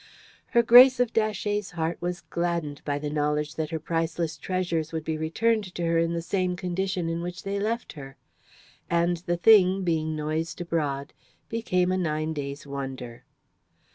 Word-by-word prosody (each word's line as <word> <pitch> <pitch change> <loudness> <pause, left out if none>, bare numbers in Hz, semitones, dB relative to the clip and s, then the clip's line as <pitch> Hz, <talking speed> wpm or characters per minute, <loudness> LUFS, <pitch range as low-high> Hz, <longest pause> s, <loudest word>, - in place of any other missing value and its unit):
Her 235 - +3
Grace 250 +2 +8
of 245 -2 +1
Datchet's 210 -2 0
heart 165 +1 -2
was 175 0 -3
gladdened 170 -4 -3
by 145 -1 -1
the 145 0 -4
knowledge 150 0 0
that 155 -1 -3
her 160 - -2
priceless 165 0 -2
treasures 175 -4 -2
would 160 -1 -3
be 160 0 -2
returned 190 +5 0
to 175 - -3
her 165 0 +2
in 165 0 +1
the 170 -1 -2
same 185 0 0
condition 185 0 -2
in 165 0 -2
which 175 +1 -6
they 200 0 -2
left 225 +3 -2
her. 135 -3 -10 0.7
And 170 +1 +2
the 175 +1 -2
thing, 190 -1 +5
being 160 -2 0
noised 155 +3 -3
abroad, 150 -5 -2 0.4
became 185 -6 0
a 185 - 0
nine 155 -2 -1
days' 140 -1 -5
wonder. 135 -4 -6
170 Hz, 170 wpm, -26 LUFS, 155-185 Hz, 0.7 s, Grace